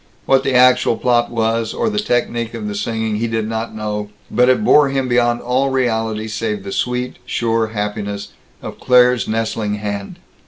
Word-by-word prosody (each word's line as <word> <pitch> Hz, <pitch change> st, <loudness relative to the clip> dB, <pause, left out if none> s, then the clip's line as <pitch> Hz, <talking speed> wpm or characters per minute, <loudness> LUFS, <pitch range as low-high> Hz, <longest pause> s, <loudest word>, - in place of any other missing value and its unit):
What 135 Hz, 0 st, +3 dB
the 135 Hz, -2 st, 0 dB
actual 125 Hz, -2 st, +4 dB
plot 120 Hz, -1 st, +2 dB
was, 115 Hz, -1 st, -1 dB
or 235 Hz, -, 0 dB
the 210 Hz, -1 st, 0 dB
technique 120 Hz, -, -1 dB
of 110 Hz, -2 st, -5 dB
the 105 Hz, -, -3 dB
singing, 110 Hz, +1 st, -2 dB
he 115 Hz, +2 st, -1 dB
did 110 Hz, -1 st, -2 dB
not 110 Hz, 0 st, -4 dB
know, 105 Hz, -1 st, -4 dB, 0.2 s
but 125 Hz, +1 st, +3 dB
it 130 Hz, +12 st, +3 dB
bore 150 Hz, -8 st, +5 dB
him 135 Hz, -1 st, -1 dB
beyond 120 Hz, -1 st, +2 dB
all 130 Hz, +3 st, 0 dB
reality 110 Hz, -4 st, -1 dB
save 105 Hz, -2 st, -3 dB
the 100 Hz, -, -6 dB
sweet, 125 Hz, +3 st, -2 dB
sure 115 Hz, -1 st, 0 dB
happiness 105 Hz, -1 st, -4 dB, 0.3 s
of -, -, -8 dB
Claire's 125 Hz, -2 st, +4 dB
nestling 110 Hz, -1 st, -1 dB
hand. 100 Hz, -1 st, -5 dB
115 Hz, 175 wpm, -18 LUFS, 110-125 Hz, 0.3 s, bore